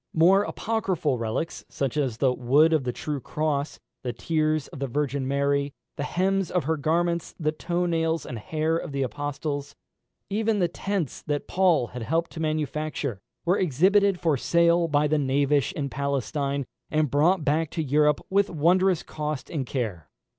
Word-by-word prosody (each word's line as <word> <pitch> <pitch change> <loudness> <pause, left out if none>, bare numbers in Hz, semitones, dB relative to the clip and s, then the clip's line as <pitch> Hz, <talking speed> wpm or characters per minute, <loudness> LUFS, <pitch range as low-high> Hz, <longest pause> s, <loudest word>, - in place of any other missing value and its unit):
More 180 +5 +6
apocryphal 190 - -1
relics, 115 +8 -3
such 135 -1 -2
as 135 -7 0
the 130 0 +2
wood 140 +6 +4
of 150 -5 +2
the 125 - 0
true 145 +3 -4
cross, 150 +1 -2 0.2
the 125 - -2
tears 155 0 0
of - - -10
the 135 - -1
Virgin 140 0 -1
Mary, 140 0 0 0.2
the - - -5
hems 190 +4 0
of 180 - 0
her 160 +4 0
garments, 170 +3 0
the 155 -2 +1
toe 175 +3 -2
nails 165 -1 0
and 120 - -6
hair 155 +7 -1
of 150 - -6
the 140 -1 0
Apostles 145 +3 -4 0.5
even 215 +1 0
the 180 -3 +2
tents 185 -3 -3
that 145 -1 -1
Paul 175 -10 +3
had 125 - -7
helped 165 +8 -1
to 165 - -8
manufacture 155 -6 -2 0.3
were 180 +3 +3
exhibited 190 +4 +3
for 160 -5 +2
sale 170 +4 +3
by 150 -1 +2
the 155 0 +2
knavish 140 +2 +2
in 145 -6 -2
Palestine, 140 0 -2 0.2
and 155 -3 +1
brought 160 +3 +3
back 155 +2 +1
to 160 - -2
Europe 150 +1 +3
"with 200 +1 +2
wondrous 180 +3 +3
cost 150 -2 -4
and 140 -6 -2
care." 100 - -3
150 Hz, 170 wpm, -26 LUFS, 140-170 Hz, 0.5 s, More